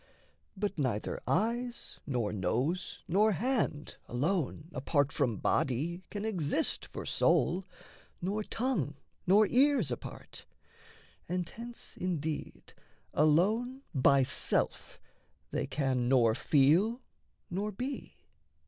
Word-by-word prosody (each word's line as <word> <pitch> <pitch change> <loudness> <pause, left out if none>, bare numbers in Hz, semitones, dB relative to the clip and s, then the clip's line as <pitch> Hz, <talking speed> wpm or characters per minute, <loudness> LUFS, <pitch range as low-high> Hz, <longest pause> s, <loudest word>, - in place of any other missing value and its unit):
But 200 -3 -2
neither 120 -7 -1
eyes, 235 +5 -1
nor 120 -7 -1
nose, 125 - -1
nor 210 +5 +4
hand, 215 - -1
alone 155 +3 -1
Apart 140 +2 +1
from 125 -8 0
body 155 - 0
can 205 0 -4
exist 180 -10 0
for - - -7
soul, 185 +2 +2 0.5
Nor 200 +4 -1
tongue 210 - -1 0.3
nor 205 +4 +6
ears 255 - +3
apart. 120 - -7 0.8
And 180 0 -1
hence 235 +4 -8
indeed 160 -4 -4 0.4
Alone 215 - +2
by 135 -1 +5
self - - -1 0.5
they - - -1
can 130 -3 0
nor 120 -4 +5
feel 165 - +3 0.5
nor 205 +4 -1
be. 255 +7 -5
175 Hz, 105 wpm, -31 LUFS, 140-215 Hz, 0.8 s, nor